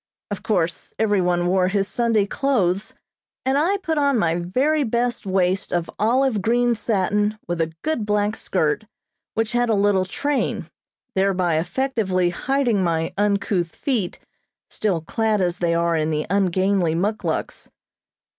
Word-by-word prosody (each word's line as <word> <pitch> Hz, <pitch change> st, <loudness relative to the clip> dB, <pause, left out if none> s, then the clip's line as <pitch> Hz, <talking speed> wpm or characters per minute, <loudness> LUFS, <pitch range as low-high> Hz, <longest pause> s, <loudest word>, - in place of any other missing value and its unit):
Of 205 Hz, -, -3 dB
course 175 Hz, -5 st, -1 dB
every 205 Hz, -3 st, +2 dB
one 175 Hz, -1 st, +1 dB
wore 185 Hz, 0 st, +2 dB
his 195 Hz, 0 st, 0 dB
Sunday 230 Hz, -3 st, +1 dB
clothes 205 Hz, -6 st, 0 dB, 0.5 s
and 265 Hz, +1 st, +2 dB
I 340 Hz, +8 st, +2 dB
put 325 Hz, -5 st, -1 dB
on 280 Hz, -3 st, +3 dB
my 170 Hz, -6 st, +2 dB
very 255 Hz, -, +1 dB
best 240 Hz, -2 st, -1 dB
waist 185 Hz, 0 st, +1 dB
of 175 Hz, -1 st, -1 dB
olive 240 Hz, 0 st, +2 dB
green 240 Hz, +3 st, +2 dB
satin 210 Hz, -1 st, 0 dB
with 175 Hz, -1 st, -1 dB
a 160 Hz, 0 st, -1 dB
good 310 Hz, -7 st, -1 dB
black 210 Hz, 0 st, 0 dB
skirt, -, -, -1 dB, 0.5 s
which 225 Hz, 0 st, 0 dB
had 240 Hz, -1 st, +1 dB
a 220 Hz, -, +3 dB
little 200 Hz, -2 st, +2 dB
train, 285 Hz, +9 st, -2 dB, 0.4 s
thereby 185 Hz, -5 st, +1 dB
effectively 190 Hz, -4 st, 0 dB
hiding 245 Hz, -1 st, 0 dB
my 165 Hz, -2 st, 0 dB
uncouth 200 Hz, -4 st, 0 dB
feet, 225 Hz, -10 st, -1 dB, 0.5 s
still 190 Hz, -6 st, -1 dB
clad 215 Hz, +6 st, 0 dB
as 180 Hz, -1 st, 0 dB
they 170 Hz, -1 st, +1 dB
are 170 Hz, 0 st, +1 dB
in 155 Hz, -1 st, 0 dB
the 150 Hz, -1 st, -1 dB
ungainly 190 Hz, -3 st, +2 dB
muckluks. 205 Hz, +5 st, -2 dB
200 Hz, 145 wpm, -22 LUFS, 180-235 Hz, 0.5 s, on